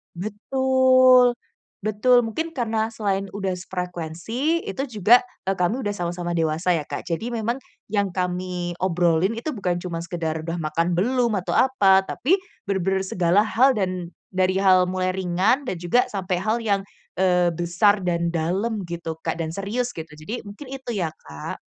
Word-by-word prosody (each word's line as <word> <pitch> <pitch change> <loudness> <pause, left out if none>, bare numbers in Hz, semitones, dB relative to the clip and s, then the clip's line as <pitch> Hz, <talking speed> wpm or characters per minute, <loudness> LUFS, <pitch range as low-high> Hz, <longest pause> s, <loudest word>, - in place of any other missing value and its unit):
Betul, 255 +4 +4 0.4
betul, 215 +4 +3
mungkin 320 +9 -3
karena 225 -4 -1
selain 195 -3 -2
udah 195 -2 -2
sefrekuensi, 180 - -3
itu 270 - -3
juga 230 +2 +5 0.2
eee, 195 - +1
kami 180 +8 0
udah 205 -4 -2
sama-sama 175 -1 -3
dewasa 165 +2 +1
ya 155 - -2
Kak, - - -6
jadi 220 +8 -2
memang 230 +1 -1 0.3
yang 200 -2 0
kami 180 -1 -3
obrolin 175 +1 +2
itu 300 +1 -4
bukan 180 -3 -1
cuma 170 -2 -5
sekedar 160 -2 -3
udah 165 +1 -3
makan 165 +2 0
belum 245 +2 +2
atau 180 - -3
apa, 195 -8 +4
tapi 310 - +1 0.3
bener-bener 190 0 0
segala 180 +2 +2
hal 255 +5 +4
dan 185 -5 -2 0.2
dari 185 +1 +2
hal 185 -2 +5
mulai 185 0 0
ringan 190 +9 +1
dan 185 - -2
juga 180 +9 +3
sampai 190 -2 -2
hal 220 +2 +1
yang, 200 -3 0 0.3
eee, 180 -1 +3
besar 180 +4 +2
dan 170 -1 0
dalam 195 +6 -1
gitu 170 -2 -5
Kak 170 - -2
dan 160 0 -3
serius 235 +5 -2
gitu, 160 -1 -7
jadi 155 +12 -7
mungkin 210 +7 -10
itu 260 -2 -6
ya 185 -7 -1 0.2
Kak. 75 0 -7
190 Hz, 160 wpm, -23 LUFS, 175-225 Hz, 0.4 s, juga